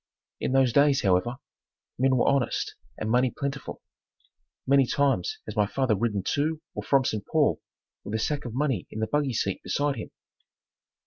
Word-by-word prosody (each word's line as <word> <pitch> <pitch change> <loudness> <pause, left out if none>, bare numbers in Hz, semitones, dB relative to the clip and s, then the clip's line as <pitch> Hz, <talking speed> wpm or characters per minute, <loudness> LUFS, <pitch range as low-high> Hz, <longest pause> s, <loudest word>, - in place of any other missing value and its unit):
In - - -1
those 135 -3 +4
days, 140 -1 +4
however, 95 +6 +2 0.6
men 130 0 +3
were 120 - +2
honest 140 -3 +1 0.2
and 110 - -3
money 125 +1 +3
plentiful. 135 +1 -5 0.8
Many 135 -1 +4
times 140 - +1
has - - -7
my 105 -2 +2
father 130 -1 +1
ridden 105 -2 -1
to 155 +1 0
or - - -4
from 135 -2 +2
St. 110 -6 -1
Paul - - +2 0.4
with 105 - -4
a - - 0
sack 145 +5 -1
of 120 -2 -6
money 135 -8 0
in 110 - -7
the 110 - +1
buggy 145 +1 0
seat 100 -3 -1
beside 145 -1 -1
him. - - -6
130 Hz, 175 wpm, -27 LUFS, 110-140 Hz, 0.8 s, those